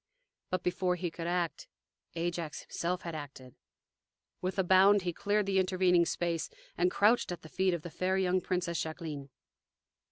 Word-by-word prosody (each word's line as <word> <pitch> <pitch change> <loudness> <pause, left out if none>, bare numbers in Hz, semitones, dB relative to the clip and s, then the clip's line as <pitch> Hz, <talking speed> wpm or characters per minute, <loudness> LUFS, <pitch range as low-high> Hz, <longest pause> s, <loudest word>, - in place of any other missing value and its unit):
But 185 -1 -1
before 180 0 +1
he 175 -1 -3
could 165 0 -5
act, 175 -1 -1 0.5
Ajax 170 -2 -3
himself 180 +2 -3
had 170 - -5
acted. 135 -4 -8 0.9
With 185 +1 -2
a 190 - +3
bound 190 +2 +6
he 175 -1 -1
cleared 205 +3 +1
the 195 -1 +2
intervening 180 -2 +3
space 170 -3 -1 0.3
and 180 +1 +3
crouched 210 +2 +3
at 175 -2 -6
the 160 - -11
feet 185 0 +1
of 160 - -7
the 175 - -7
fair 185 +3 0
young 185 -1 +2
Princess 175 -2 -1
Jacqueline! 155 -4 -5
180 Hz, 165 wpm, -31 LUFS, 170-185 Hz, 0.9 s, bound